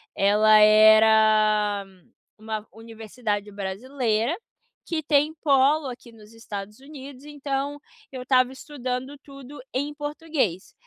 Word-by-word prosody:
ela 210 +2 +4
era 215 -1 +4 0.5
uma 215 0 -6
universidade 220 -2 -6
brasileira, 225 - -2 0.5
que 320 -2 -3
tem 295 +2 +1
polo 280 +1 +3
aqui 245 -1 -10
nos 220 -1 -17
Estados 210 -2 -9
Unidos, 275 -1 -12
então 285 -1 -4 0.3
eu 260 -2 -7
estava 255 0 +2
estudando 265 0 -6
tudo 275 0 -13
em 285 +3 -3
português. 295 - -3
245 Hz, 105 wpm, -24 LUFS, 215-280 Hz, 0.5 s, ela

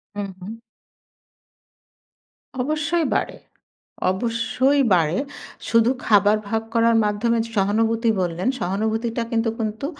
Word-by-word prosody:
হুম, 205 -1 -4
হুম। 205 +5 -7 2.1
অবশ্যই 310 +4 0
বাড়ে, - - -2 0.7
অবশ্যই 230 +7 +1
বাড়ে। 165 0 +1 0.5
শুধু 230 +1 +4 0.2
খাবার 205 0 +4
ভাগ 220 +1 -1
করার 230 0 +4
মাধ্যমে 210 +3 0
যে 230 - -10
সহানুভূতি 225 +3 +1
বললেন, 175 +5 -1
সহানুভূতিটা 220 +5 -1
কিন্তু, 225 0 +1
কিন্তু 220 +3 -3
225 Hz, 100 wpm, -22 LUFS, 205-235 Hz, 2.1 s, শুধু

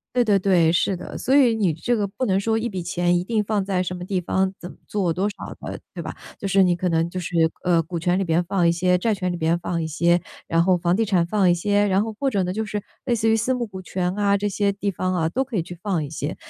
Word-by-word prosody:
对 245 - +4
对 210 -2 +3
对， 175 -4 +3
是 180 +2 +1
的。 - - -8
所 265 - +2
以 250 -5 +5
你 200 -6 +1
这 170 +10 -1
个 210 -3 0
不 255 +6 -3
能 190 -1 +2
说 225 +2 +1
一 235 +2 -2
笔 185 -4 -4
钱 175 0 +1
一 175 - 0
定 215 +2 0
放 205 -2 0
在 190 -2 0
什 180 0 -2
么 180 - -6
地 185 -1 -1
方、 190 +2 0
怎 175 - -8
么 - - -13
做、 190 -5 0
多 190 +5 0
少 - - -8
的， - - -6 0.2
对 - - -5
吧？ - - -7 0.2
就 195 - -4
是 190 0 +4
你 180 -1 +3
可 180 +1 -1
能 165 0 +1
就 185 +1 -5
是， 175 0 -6 0.3
呃， 175 -2 +3
股 170 +1 -6
权 175 +3 +1
里 195 - 0
边 165 +1 +2
放 185 -1 +1
一 - - +4
些、 180 +1 +2
债 220 +3 +1
权 185 -2 -2
里 - - -3
边 165 0 +1
放 170 0 -2
一 160 - -2
些、 170 +2 +2 0.3
然 165 0 +3
后 185 0 +4
房 175 +1 +1
地 225 - +2
产 185 -5 +2
放 195 -1 +2
一 175 - +5
些， 205 +3 +1
然 195 +1 +2
后 220 0 -4
或 280 - +1
者 200 -7 +1
呢， 180 0 -2
就 220 +2 -2
是 210 -1 -4 0.2
类 240 - +1
似 225 0 +1
于 225 - +4
私 240 +4 0
募 245 - -2
股 190 -3 -8
权 180 0 -2
啊， 200 -1 +3
这 205 +1 -1
些 200 0 0
地 200 0 -2
方 185 0 -2
啊， 165 -3 +1
都 260 +10 -1
可 245 -5 -5
以 170 - +1
去 175 0 -10
放 180 -6 -1
一 140 - -7
些。 150 0 -4
185 Hz, 325 characters per minute, -23 LUFS, 175-205 Hz, 0.3 s, 以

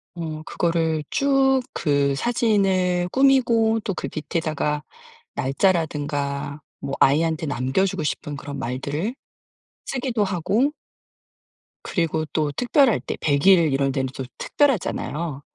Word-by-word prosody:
어 160 -2 -5
그거를 165 -2 0
쭉 270 -1 +3
그 140 -2 +1
사진을 190 - +1
꾸미고 235 -5 +3
또 200 - -2
그 175 - -4
밑에다가 155 -2 -2 0.5
날짜라든가 145 -2 -1 0.2
뭐 135 - -5
아이한테 160 +3 +3
남겨주고 145 +7 0
싶은 150 0 -3
그런 140 0 -7
말들을 140 - -3 0.7
쓰기도 250 -5 -1
하고 200 - +1 1.1
그리고 160 -3 -1
또 150 -2 0
특별할 245 - +3
때 - - -5
100 145 +2 +1
일 170 -6 +6
이럴 135 0 +1
때는 130 0 -1
또 135 - -4
특별하잖아요. 170 - -1
165 Hz, 245 characters per minute, -23 LUFS, 145-215 Hz, 1.1 s, 일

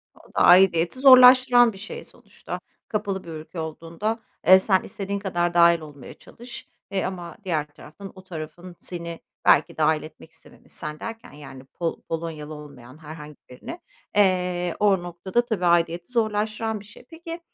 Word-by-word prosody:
O - - -21
da - - -1
aidiyeti 180 +4 +5
zorlaştıran 250 -2 +7
bir 195 - -12
şey 215 - -8
sonuçta. - - -10 0.3
Kapalı 200 -3 -3
bir - - -11
ülke 160 +2 -8
olduğunda, 165 +8 -4 0.3
eee, 190 0 +9
sen 190 -1 +1
istediğin 200 0 -5
kadar 175 -3 -1
dâhil 170 0 +5
olmaya 145 -4 -11
çalış, 240 +1 -12 0.2
eee, 195 -1 -1
ama 175 -2 -6
diğer 155 -5 -1
taraftan 155 +6 -13
o 185 - -13
tarafın 175 0 -9
seni 170 -2 -7 0.3
belki - - +4
dâhil 155 0 +2
etmek 160 +1 -13
istememiş. - - -19
Sen 150 -1 -6
derken, 225 0 -8
yani, 135 -3 -12
Pol 165 +4 -5
Polonyalı 160 -2 -6
olmayan 140 -3 -12
herhangi 150 -1 -11
birine, 230 - -9 0.3
eee, 180 -3 +1
o 195 -4 +3
noktada 185 +7 -2
tabii 210 -7 -2
aidiyeti 170 +2 +1
zorlaştıran 220 -1 -1
bir 205 - -14
şey. 210 +4 -16
Peki, 330 +1 -8
175 Hz, 155 wpm, -24 LUFS, 160-210 Hz, 0.3 s, eee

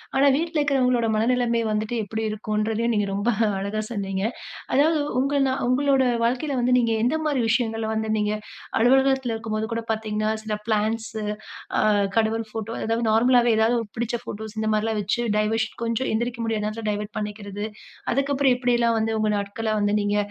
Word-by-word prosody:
ஆனா, 275 +1 +5
வீட்ல 330 +2 -1
இருக்கிறவங்களோட 255 -5 +2
மனநிலமை 235 +1 +2
வந்துட்டு 215 +2 -1
எப்படி 220 +2 -4
இருக்குன்றதையும் 215 +2 -1
நீங்க 205 -2 +1
ரொம்ப 205 +4 0 0.3
அழகா 200 +2 -2
சொன்னீங்க. 195 -4 -3 0.5
அதாவது, 305 +3 +4 0.2
உங்க 280 +2 +1
நா - - +1 0.2
உங்களுடைய 265 0 +3
வாழ்க்கையில 255 +5 0
வந்து 245 +1 +1
நீங்க 235 -2 +2
எந்த 245 +7 +2
மாரி 290 -4 +1
விஷயங்கள 225 -2 0
வந்து 220 0 -1
நீங்க 210 0 0 0.5
அலுவலகத்தில 265 0 +3
இருக்கும்போது 220 -1 -3
கூட 230 - -1
பார்த்தீங்கன்னா, 215 -1 -1
சில 215 -1 -2
பிளான்ட்ஸ் 220 +1 0 0.7
அ - - +3 0.4
கடவுள் 225 0 +1
போட்டோ 225 0 -4
அதாவது 225 +1 0
நார்மலாவே 240 +1 +4
ஏதாவது 225 +2 +3 0.2
புடிச்ச 240 +1 -1
போட்டோஸ் 220 +1 -7
இந்த 220 - 0
மாரில்லாம் 215 0 0
வச்சு 205 +4 -1 0.2
டைவர்ஷன் 220 +1 0
கொஞ்சம் 230 +3 -1
எந்திரிக்க 235 +1 -2
முடியாத 220 -2 -1
நேரத்துல 215 +1 -4
டைவர்ட் 210 0 -3
பண்ணிக்கிறது. 205 -1 -5 0.5
அதுக்கப்புறம் 275 0 +2
எப்டில்லாம் 240 -2 +2
வந்து 225 0 0
உங்க 215 0 +1
நாட்கள 205 +3 -3
வந்து 205 0 +2
நீங்க 205 0 0
225 Hz, 160 wpm, -24 LUFS, 215-245 Hz, 0.7 s, ஆனா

